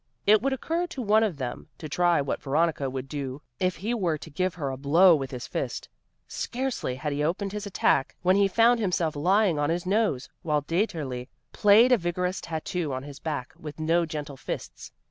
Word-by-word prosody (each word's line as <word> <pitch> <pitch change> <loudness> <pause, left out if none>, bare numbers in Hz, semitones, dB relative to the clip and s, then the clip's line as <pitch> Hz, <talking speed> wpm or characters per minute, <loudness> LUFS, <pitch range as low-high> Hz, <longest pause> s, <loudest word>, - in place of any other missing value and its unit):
It 210 0 +6
would 270 +3 0
occur 330 +7 -1
to 310 -7 -6
one 215 +1 +4
of 205 -9 0
them 125 -3 -5
to 155 - -7
try 175 +1 +2
what 140 - -3
Veronica 150 -1 0
would 130 0 -5
do 140 -1 -5 0.2
if 185 -1 +1
he 215 +6 -3
were 180 -9 0
to 155 +1 -11
give 185 +4 -1
her 145 -6 -3
a - - -4
blow 165 +7 +5
with 135 -3 -3
his 125 -2 -6
fist. - - -4 0.4
Scarcely 250 - -3
had 145 +3 -3
he 145 +1 -1
opened 190 +5 -1
his 210 0 -5
attack 140 -7 +1
when 185 +1 +4
he 200 0 +4
found 230 +4 +4
himself 180 -7 0
lying 180 +2 +2
on 145 +1 +1
his 170 +2 -1
nose, 195 - +1
while 150 -3 0
Dieterli 150 - -2 0.2
played 220 +4 +6
a 250 - +5
vigorous 180 +1 -2
tattoo 165 0 -3
on 130 0 -4
his 140 -1 -10
back 145 -6 -4
with 150 -1 -8
no 165 +2 +2
gentle 150 -3 -6
fists. - - -7
170 Hz, 205 wpm, -27 LUFS, 145-200 Hz, 0.4 s, It